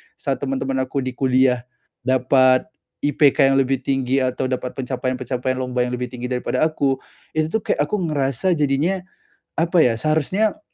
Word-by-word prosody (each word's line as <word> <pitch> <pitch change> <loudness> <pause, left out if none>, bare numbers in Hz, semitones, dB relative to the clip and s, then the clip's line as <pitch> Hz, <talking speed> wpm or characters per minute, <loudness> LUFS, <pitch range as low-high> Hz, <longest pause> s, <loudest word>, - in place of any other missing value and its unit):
saat 135 -2 -2
teman-teman 135 -1 -2
aku 135 +1 -2
di 130 0 -3
kuliah 130 -2 +2 0.4
dapat 130 +1 +3 0.3
IPK 145 -1 +4
yang 135 - +3
lebih 135 -1 +1
tinggi 135 0 0
atau 130 +1 -1
dapat 130 -1 -3
pencapaian-pencapaian 130 0 -2
lomba 125 -1 -1
yang 125 0 0
lebih 125 - -2
tinggi 125 0 -5
daripada 125 -1 -1
aku, 140 -4 +1 0.3
itu 155 0 0
tuh 220 - -1
kayak - - +1
aku 210 - 0
ngerasa 140 +5 0
jadinya, 150 +5 +1 0.6
apa 170 +1 +2
ya, 125 -6 +4
seharusnya, 185 - +1
135 Hz, 155 wpm, -21 LUFS, 130-145 Hz, 0.6 s, IPK